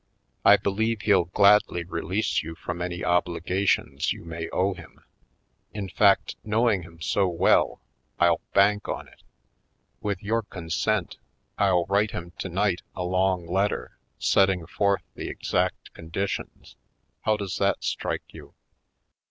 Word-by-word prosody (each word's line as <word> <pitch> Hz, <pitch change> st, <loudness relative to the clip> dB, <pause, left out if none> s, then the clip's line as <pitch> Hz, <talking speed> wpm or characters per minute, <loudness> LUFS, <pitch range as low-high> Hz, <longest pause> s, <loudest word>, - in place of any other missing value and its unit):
I 100 Hz, +1 st, +8 dB
believe 105 Hz, +2 st, -1 dB
he'll 95 Hz, -5 st, +4 dB
gladly 100 Hz, -1 st, +4 dB
release 90 Hz, +5 st, -1 dB
you 80 Hz, +2 st, -7 dB
from 85 Hz, +1 st, -5 dB
any 90 Hz, -1 st, -3 dB
obliga 90 Hz, +2 st, 0 dB
tions -, -, +1 dB
you -, -, -6 dB
may 85 Hz, 0 st, -5 dB
owe 95 Hz, +2 st, +1 dB
him. 85 Hz, -3 st, -14 dB, 0.7 s
In 100 Hz, -2 st, -4 dB
fact, 100 Hz, +1 st, +3 dB
knov/ing 110 Hz, -2 st, +2 dB
him 85 Hz, -1 st, -14 dB
so 95 Hz, +3 st, +1 dB
well, 85 Hz, -2 st, +2 dB, 0.4 s
I'll 85 Hz, -2 st, +3 dB
bank 105 Hz, +1 st, +3 dB
on -, -, -4 dB
it. -, -, -21 dB, 0.8 s
With 100 Hz, -3 st, -3 dB
your 115 Hz, +3 st, +1 dB
con 90 Hz, -6 st, -9 dB
sent 105 Hz, +2 st, 0 dB, 0.4 s
I'll 95 Hz, -4 st, +3 dB
write 100 Hz, +2 st, +2 dB
him 85 Hz, 0 st, -6 dB
tonight, 95 Hz, 0 st, 0 dB
a 90 Hz, -, -3 dB
long 90 Hz, 0 st, +1 dB
letter, 95 Hz, +4 st, -1 dB, 0.2 s
setting 95 Hz, -3 st, +2 dB
forth 100 Hz, +4 st, 0 dB
the -, -, -6 dB
exact -, -, -2 dB
conditions. 90 Hz, +4 st, -5 dB, 0.5 s
How 110 Hz, 0 st, +1 dB
does 100 Hz, -4 st, -4 dB
that -, -, +1 dB
strike -, -, -2 dB
you." -, -, -13 dB
95 Hz, 140 wpm, -26 LUFS, 85-100 Hz, 0.8 s, I